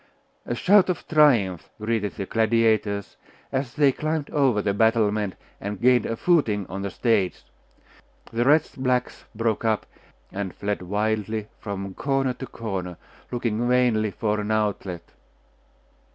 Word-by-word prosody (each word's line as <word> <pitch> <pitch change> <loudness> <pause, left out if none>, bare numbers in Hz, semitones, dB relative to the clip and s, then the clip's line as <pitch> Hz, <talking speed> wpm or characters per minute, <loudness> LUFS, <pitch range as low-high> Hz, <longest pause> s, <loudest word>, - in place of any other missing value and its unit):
A 120 - -1
shout 190 +8 +5
of 180 - -3
triumph 120 - +3
greeted 110 -1 -1
the 100 - -4
gladiators 110 - +1 0.3
as 130 -1 -2
they 145 -2 +5
climbed 155 +1 -3
over 135 -7 +2
the 100 -1 0
battlement, 105 -2 +2 0.2
and 100 0 -5
gained 125 +1 +4
a 115 - -2
footing 115 - +2
on 95 +3 -6
the 100 - -2
stage. 100 -2 0 0.9
The 115 +1 +1
wretched 145 0 +2
blacks 125 -1 -1
broke 115 0 0
up, 110 -2 +1 0.5
and 95 -2 -4
fled 105 -1 -2
wildly 105 +2 -2
from 100 -2 -5
corner 135 +2 0
to 130 +1 -8
corner, 95 -6 -5 0.3
looking 120 -1 -1
vainly 120 -4 +3
for 105 +1 -1
an 105 0 -3
outlet.... 100 -5 -1
110 Hz, 140 wpm, -24 LUFS, 100-125 Hz, 0.9 s, shout